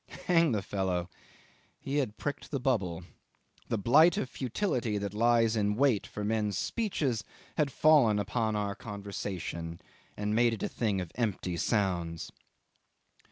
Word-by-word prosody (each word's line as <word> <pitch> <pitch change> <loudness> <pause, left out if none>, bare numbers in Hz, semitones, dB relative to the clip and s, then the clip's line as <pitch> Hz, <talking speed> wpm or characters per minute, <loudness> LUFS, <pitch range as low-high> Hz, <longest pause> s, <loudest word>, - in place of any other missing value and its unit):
Hang 165 -4 +4
the 105 -4 0
fellow! 90 -3 -2 0.7
he 140 +2 -3
had 120 -7 -1
pricked 145 - -4
the 140 - -2
bubble. 100 - 0 0.6
The 115 - 0
blight 155 - +5
of 130 - -2
futility 125 - -1
that 100 -1 -3
lies 115 0 +3
in 105 -1 +1
wait 125 -4 +2
for 105 - -6
men's 105 -1 0
speeches 145 - -1 0.3
had 150 -3 +1
fallen 135 -8 +5
upon 110 +2 0
our 100 -1 -1
conversation, 95 -5 -5 0.4
and 105 0 -1
made 120 +1 +4
it - - -7
a - - +1
thing 105 -5 -1
of 90 - -6
empty 100 -6 -2
sounds. 85 -5 -1
105 Hz, 145 wpm, -30 LUFS, 100-125 Hz, 0.7 s, blight